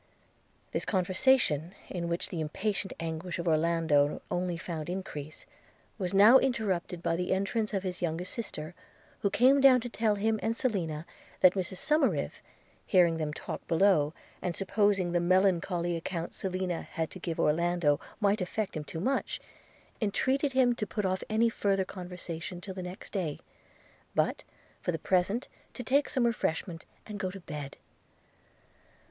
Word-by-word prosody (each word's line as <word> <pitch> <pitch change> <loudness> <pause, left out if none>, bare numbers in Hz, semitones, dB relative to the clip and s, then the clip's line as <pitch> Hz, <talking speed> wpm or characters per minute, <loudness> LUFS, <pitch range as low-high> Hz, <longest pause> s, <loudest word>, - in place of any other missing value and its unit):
This - - -1
conversation, 185 - +2
in 170 -2 -3
which 170 +1 -2
the 170 - -3
impatient 195 +6 -2
anguish 165 +2 -4
of 170 0 -4
Orlando 160 -2 +3
only 175 -1 -1
found 165 -2 -5
increase, 160 -5 -6 0.5
was 185 -2 -1
now 210 +7 +8
interrupted 190 -9 -1
by 165 - +1
the 180 +1 -2
entrance 200 +3 0
of 195 -3 -1
his 185 -1 -4
youngest 175 +1 -2
sister, 175 -8 -5 0.5
who 200 - +1
came 260 +7 +5
down 265 -2 +8
to 245 - -5
tell 220 -2 +1
him 220 +2 +1
and 225 +1 -1
Selina 170 -11 -1 0.4
that 185 -1 +7
Mrs 190 -1 -3
Somerive, 305 - +1 0.5
hearing 175 -4 +4
them 155 -2 -2
talk - - -7
below, 165 -4 +4 0.3
and 175 -2 -2
supposing 195 -2 +2
the 175 - +2
melancholy 175 -1 +2
account 170 0 -4
Selina 185 -2 -2
had 160 -1 -4
to 185 - -9
give 170 -2 -4
Orlando 165 -1 +2 0.2
might 205 -1 +2
effect 195 +3 -2
him 155 - -3
too 160 +2 -6
much, 265 +10 -1 0.6
entreated 265 +6 +1
him 255 -2 +4
to 210 - -2
put 210 -1 -2
off 185 0 0
any 220 +2 +3
further 195 -4 +1
conversation 180 -2 -6
till 190 +1 -7
the 185 - -6
next 180 +1 -8
day, 175 -7 -2 0.8
but - - +1 0.4
for - - 0
the 165 - -2
present 190 - +1 0.3
to 250 - -5
take 280 +4 +2
some 255 -3 +2
refreshment 170 -6 -1 0.2
and 210 -2 -7
go 190 -2 -1
to 195 +1 -9
bed. 150 -4 -7
185 Hz, 155 wpm, -30 LUFS, 170-210 Hz, 0.8 s, now